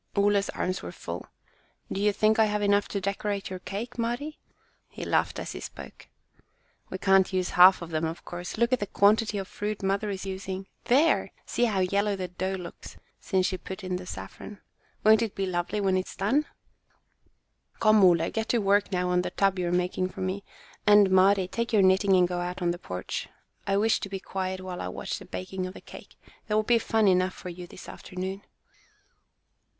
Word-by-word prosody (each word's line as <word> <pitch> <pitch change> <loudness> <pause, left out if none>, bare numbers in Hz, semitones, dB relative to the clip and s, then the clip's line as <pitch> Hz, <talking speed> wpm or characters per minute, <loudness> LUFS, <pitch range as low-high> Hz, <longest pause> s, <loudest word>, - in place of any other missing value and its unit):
Ole's 200 0 +2
arms 185 +1 -2
were - - -6
full. - - -7 0.6
"Do 195 - -2
you 210 0 +4
think 215 +2 +2
I 220 - +6
have 210 -1 -1
enough 205 0 +3
to 200 - -3
decorate 200 0 -3
your 185 - -5
cake, 215 +7 -6
Mari?" 240 +7 -3 0.5
He - - -7
laughed - - +1
as - - -5
he - - -6
spoke. - - -10 0.8
"We 185 - -4
can't 195 0 +4
use 185 -1 -1
half 180 0 +7
of 170 - -9
them, 160 0 0
of 160 +1 -5
course. 175 +2 -6
Look 235 +2 +2
at 255 - +3
the 205 - -3
quantity 210 +2 +3
of 195 -1 -4
fruit 210 0 -4
mother 195 +2 0
is 195 -1 -4
using. 190 0 -5 0.2
There! 290 +7 +3
see 240 - +1
how 205 -5 +1
yellow 200 +2 +1
the 185 -2 -4
dough 185 +2 -3
looks 180 -2 -9 0.2
since 190 -2 0
she 185 -1 -1
put 190 +3 -8
in 185 -1 -2
the 180 0 -9
saffron. 205 +2 -8 0.4
Won't 220 +1 +6
it 225 -3 -2
be 195 - -1
lovely 180 +3 -2
when 195 -2 +2
it 185 0 -1
is - - -9
done?" 255 +10 +1 1.3
"Come, 215 -2 +5
Ole, 170 -2 +4
get 225 0 -3
to 240 - +3
work 205 -1 +2
on 180 -1 +1
that - - -6
tub 195 -1 +2
you 180 - 0
are - - -1
making 180 +1 0
for 190 - -9
me. 185 +2 -2 0.4
And, 205 -2 +7
Mari, 190 0 +4
take 235 +5 -3
your 210 -4 +4
knitting 190 +1 +4
and 180 -1 +4
go 175 0 -3
out 180 +1 -4
on 175 -2 +1
the 175 - -5
porch. 90 - -5 0.4
I 195 0 +2
wish 220 +2 +3
to 200 - -6
be 195 0 -4
quiet 185 0 -4
while 185 -1 -6
I - - -3
watch 90 - -4
the - - -11
baking 185 0 -5
of 185 - -9
the - - -8
cake. - - -13 0.3
There 210 -1 +1
will 215 - +3
be 235 +1 +3
fun 220 -2 +2
enough 185 0 +3
for 180 - -8
you 175 0 -8
this 180 - -12
afternoon." 190 +2 -6
195 Hz, 210 wpm, -27 LUFS, 185-210 Hz, 1.3 s, half